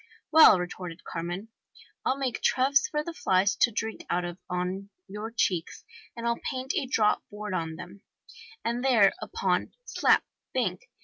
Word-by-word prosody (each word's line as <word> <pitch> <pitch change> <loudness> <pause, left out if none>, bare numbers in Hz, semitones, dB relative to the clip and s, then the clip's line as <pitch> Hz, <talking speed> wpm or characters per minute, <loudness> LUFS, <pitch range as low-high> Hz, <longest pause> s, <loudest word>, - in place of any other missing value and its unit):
'Well,' 315 -10 +9
retorted 180 -1 -6
Carmen, 175 +6 -5 0.5
'I'll 265 - +1
make 265 -3 -2
troughs 275 +1 +3
for 300 0 -1
the 340 - -6
flies 195 - +2
to - - +4
drink 220 0 -4
out 180 0 0
of 175 +1 -6
on 180 +2 -3 0.2
your 210 +3 -6
cheeks, 185 -7 -1 0.3
and 235 - -5
I'll 235 0 0
paint 260 +1 -3
a 265 - -1
draught 220 -4 +2
board 210 -1 -6
on 165 -3 -2
them!' 180 +4 -10 0.3
* 470 -1 -18
And 235 +2 -1
thereupon, 270 - +2
slap, - - +3 0.3
bank! 190 -8 -1
210 Hz, 160 wpm, -28 LUFS, 180-260 Hz, 0.5 s, Well